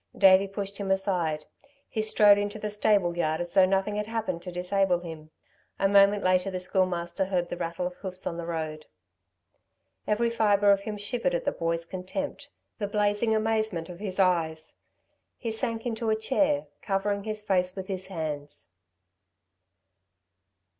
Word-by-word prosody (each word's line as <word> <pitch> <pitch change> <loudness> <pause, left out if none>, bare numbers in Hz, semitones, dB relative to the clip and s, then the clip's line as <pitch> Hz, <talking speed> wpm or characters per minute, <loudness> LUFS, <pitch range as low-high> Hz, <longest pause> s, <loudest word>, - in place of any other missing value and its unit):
Davey 195 0 +6
pushed 200 0 -5
him 200 -1 -3
aside. 180 -6 0 0.4
He 220 - -2
strode 210 -1 +5
into 205 +1 -2
the 210 0 -4
stable 205 -4 +2
yard 160 -2 0
as 175 0 -4
though 190 -1 +6
nothing 195 +2 0
had 210 0 -2
happened 225 -6 -2
to 180 0 -7
disable 180 0 +1
him. 160 -3 -9 0.5
A 195 - +3
moment 200 +1 +5
later 185 +1 +2
the 185 -1 -3
Schoolmaster 180 0 0
heard 180 -2 -1
the 175 - -4
rattle 170 +1 -3
of 180 - -3
hoofs 185 -1 -6
on 170 - -3
the 170 -1 -5
road. 155 -2 -4 1.2
Every 230 +2 +1
fibre 205 -3 +4
of 200 - +4
him 210 +1 -5
shivered 245 - -1
at - - -2
the - - +2
boy's 165 0 -2
contempt, 280 +11 -5 0.3
the 205 - -1
blazing 210 +2 +1
amazement 215 -6 0
of 175 -1 -9
his 200 -2 -4
eyes. 160 -4 +1 0.6
He 230 - -3
sank 225 0 -2
into 230 -1 -2
a 220 - +3
chair, 285 +6 +1 0.2
covering 200 0 -1
his 215 -1 -4
face 185 -2 +1
with 190 -1 -5
his 190 -1 -3
hands. 150 - -5
195 Hz, 165 wpm, -27 LUFS, 175-210 Hz, 1.2 s, Davey